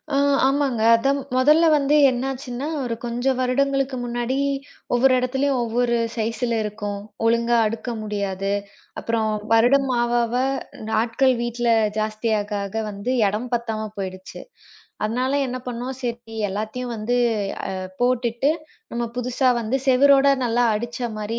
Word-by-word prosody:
ஆ - - +3 0.3
ஆமாங்க. 270 -4 0
அது 230 +4 +1 0.3
முதல்ல 300 +6 +5
வந்து 290 0 +2
என்ன 250 0 -2
ஆச்சுன்னா 260 +1 -5 0.2
ஒரு 235 -2 -2
கொஞ்சம் 245 +2 0
வருடங்களுக்கு 275 +1 +1
முன்னாடி 240 +2 -2 0.6
ஒவ்வொரு 255 +2 +4
இடத்திலயும் 265 +1 0
ஒவ்வொரு 235 +1 0 0.2
சைஸ்ல 230 +1 -1
இருக்கும். 205 -1 -4 0.3
ஒழுங்கா 235 +1 +3
அடுக்க 230 +3 -5
முடியாது. 200 -2 -2 0.5
அப்புறம் 225 -1 -1 0.2
வருடம் 265 +4 +4
ஆவ 240 0 0
ஆவ 230 +1 -4 0.6
ஆட்கள் 230 +4 +2
வீட்ல 240 0 -1 0.3
ஜாஸ்தியா 215 +1 0
ஆக 205 - -8
ஆக 200 +2 -9 0.2
வந்து 200 +5 -3
இடம் 215 +5 -3
பத்தாம 220 -2 -3
போயிடுச்சு. 185 -1 -6 0.6
அதனால 250 +5 -1
என்ன 255 0 -3
பண்ணோம், 250 +2 -4
சரி 235 -2 -5
எல்லாத்தையும் 220 +5 -4
வந்து 220 +3 -1 0.6
அ - - -4 0.2
போட்டுட்டு 245 +1 +1 0.4
நம்ம 235 0 -1
புதுசா 250 +1 +1
வந்து 230 +3 -1
சுவரோட 275 +1 +5 0.2
நல்லா 240 0 +1
அடிச்ச 235 +2 -5 0.2
மாரி 215 +2 -3
240 Hz, 130 wpm, -22 LUFS, 220-255 Hz, 0.6 s, முதல்ல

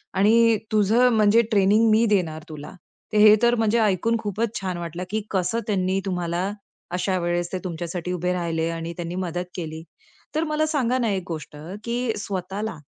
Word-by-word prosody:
आणि 225 +3 +5
तुझं 220 +4 +4
म्हणजे 215 +1 +5
ट्रेनिंग 210 +2 +4
मी 225 +2 +4
देणार 165 -7 0
तुला. 150 -1 -8 0.4
तर 215 - +2
हे 210 0 +8
तर 240 0 +4
म्हणजे 225 0 +2
ऐकून 220 +2 +2
खूपच 220 +1 -2
छान 185 -2 -3
वाटलं 170 +1 -5
की 215 +1 -1
कसं 195 +4 0
त्यांनी 190 -2 +1
तुम्हाला 180 +1 -2 0.4
अशा 185 +1 0
वेळेस 175 0 -1
ते 185 - 0
तुमच्यासाठी 175 0 -4
उभे 180 +1 -1
राहिले 165 -2 -1
आणि 165 0 -4
त्यांनी 175 0 -4
मदत 175 +1 -3
केली. 160 -2 -6 0.5
तर 315 - +1
मला 305 0 0
सांगा 260 -5 0
ना 235 -3 0
एक 190 -2 -2
गोष्ट 155 -3 -6 0.3
की 235 0 -1
स्वतःला 200 +1 -4
190 Hz, 170 wpm, -24 LUFS, 175-225 Hz, 0.5 s, हे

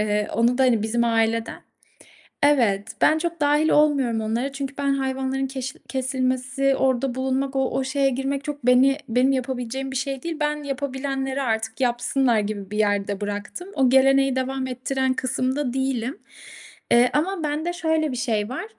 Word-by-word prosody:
Eee, 210 0 0
onu 235 +3 +2
da - - +4
hani 235 -5 +3
bizim 235 +2 0
aileden 225 0 0 0.8
Evet. 230 -8 +3
Ben 310 - +4
çok 340 0 -3
dâhil 295 +2 +3
olmuyorum 280 -6 +3
onlara. 230 +5 -2
Çünkü 275 0 -5
ben 280 -1 +1
hayvanların 265 0 -1
keş 265 0 -5
kesilmesi, 260 +1 0
orada 260 -1 +1
bulunmak, 265 +1 -1
o 265 0 0
şe 260 - -4
şeye 275 0 +2
girmek 270 +2 -2
çok 290 -4 -5
beni 265 +3 +5
benim 250 +4 +3
yapabileceğim 260 0 -3
bir 265 - -5
şey 270 0 -3
değil. 335 -1 -4
Ben 300 0 -1
yapabilenleri 270 0 -3
artık 220 -1 -2
yapsınlar 245 0 +1
gibi 205 -2 -3
bir 210 - -4
yerde 205 -1 0
bıraktım. 205 - -5
O 265 -3 +3
geleneği 270 0 +4
devam 260 0 -2
ettiren 260 +1 -1
kısımda 260 +1 -1
değilim, 265 0 -2 0.7
eee, 240 +1 +5
ama 340 +4 0
bende 305 +4 -1
şöyle 320 -4 0
bir - - -4
şey 220 -3 -1
var. 255 - -4
265 Hz, 165 wpm, -23 LUFS, 240-275 Hz, 0.8 s, beni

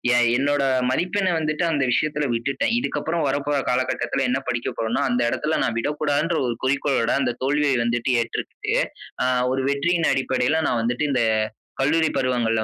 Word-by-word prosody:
ஏன் 120 0 +4
என்னோட 145 +1 +1 0.3
மதிப்பெண்ணை 185 +7 0
வந்துட்டு 155 +1 -1
அந்த 145 -4 +1
விஷயத்துல 150 +3 0
விட்டுட்டேன். 135 - -1
இதுக்கப்பறம் 170 -9 -1
வரப்போற 145 +1 -1
காலகட்டத்துல 125 0 0
என்ன 130 +2 +1
படிக்க 120 -1 -1
போறோம்னா, 115 +1 -1
அந்த 125 0 +1
எடத்துல 155 +6 -1
நான் 115 - -1
விடக்கூடாதுங்குற 150 +5 0
ஒரு 120 - -2
குறிக்கோளோட 135 -2 +1
அந்த 125 -2 +1
தோல்விய 145 +2 +1
வந்துட்டு 120 +2 0
ஏற்றுக்கிட்டு, 115 - -3 0.5
அ - - +1 0.3
ஒரு 135 0 -1
வெற்றியின் 165 +4 +1
அடிப்படையில 135 +3 +1
நான் 120 - +1
வந்துட்டு, 120 +5 -1
இந்த 125 -3 +2 0.6
கல்லூரி 160 +3 +2
பருவங்கள்ல 120 -4 +1
135 Hz, 150 wpm, -23 LUFS, 125-150 Hz, 0.6 s, ஏன்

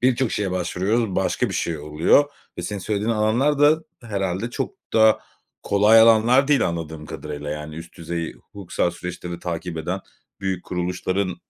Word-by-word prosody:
birçok 130 -1 +2
şeye 100 -2 -1
başvuruyoruz, 95 +4 0
başka - - +1
bir - - -5
şey 80 -2 -1
oluyor 75 - +3 0.3
ve - - -3
senin 100 +2 -4
söylediğin 105 +3 -1
alanlar 115 +7 +2
da 155 +2 +5 0.2
herhalde 100 0 -2
çok - - -3 0.2
da 110 -1 +5 0.4
kolay 105 +3 +5
alanlar 115 +5 +5
değil 140 -10 +4
anladığım 80 -2 -5
kadarıyla. 75 -1 -6
Yani 75 0 -5
üst 85 +1 -10
düzey 85 0 -4
hukuksal 95 -3 -3
süreçleri 90 0 -6
takip 85 -1 -4
eden 90 +4 -3 0.4
büyük 95 -2 -2
kuruluşların 90 +1 -2
95 Hz, 150 wpm, -23 LUFS, 85-110 Hz, 0.4 s, da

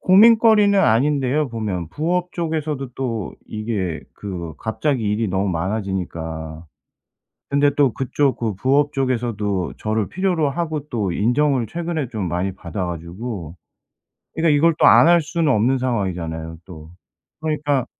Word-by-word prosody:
고민거리는 210 0 +6
아닌데요 140 +2 +2
보면. 100 -8 -3
부업 175 - -1
쪽에서도 155 -5 -2
또 115 -6 -3
이게 105 -6 -3
그 85 -6 -6
갑자기 120 +2 -1
일이 105 +1 0
너무 95 +2 0
많아지니까. 85 -4 -4 0.8
근데 145 +1 +3
또 140 -5 +3
그쪽 135 +1 0
그 110 -3 -2
부업 140 +7 +2
쪽에서도 115 - -1
저를 110 -1 -1
필요로 175 -5 0
하고 155 -1 -3
또 105 -6 -1
인정을 125 +4 +1
최근에 165 -2 -3
좀 105 -6 -3
많이 90 +3 -2
받아 90 0 -5
가지고 85 +1 -6 0.8
그러니까 160 -2 +3
이걸 165 +2 +4
또 - - +6
안 - - +7
할 170 -1 +6
수는 160 -2 0
없는 125 +5 +2
상황이잖아요 85 -9 -3
또. 80 -4 -12 0.5
그러니까 145 -4 0
120 Hz, 305 characters per minute, -21 LUFS, 95-150 Hz, 0.8 s, 안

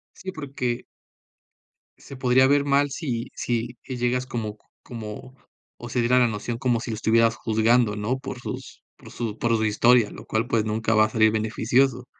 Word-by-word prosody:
Sí, 190 0 -7
porque 135 -7 -4 1.1
se 140 - -11
podría 130 +1 +4
ver 140 +1 +3
mal 140 0 +2
si 125 -5 -4
si 120 0 -2
y 130 -2 -6
llegas 125 +1 0
como 110 -4 -4 0.3
como, 115 +3 -8 0.4
o 120 - -9
se 120 - -1
diera 125 +2 +3
la 125 - +4
noción 115 +2 -4
como 125 -3 +1
si 115 - -5
lo - - -2
estuvieras 115 +1 +3
juzgando, 110 0 +2
¿no?, 115 +6 -2
por 130 -2 -7
sus - - -8
por - - -14
su 115 -2 -4
por 115 -1 +2
su 110 - 0
historia, 115 +1 +4
lo - - -11
cual, 110 +2 -1
pues 115 -3 +1
nunca 110 +1 0
va 110 0 +6
a - - -3
salir 110 -1 +3
beneficioso. 120 +4 +1
120 Hz, 185 wpm, -24 LUFS, 110-125 Hz, 1.1 s, va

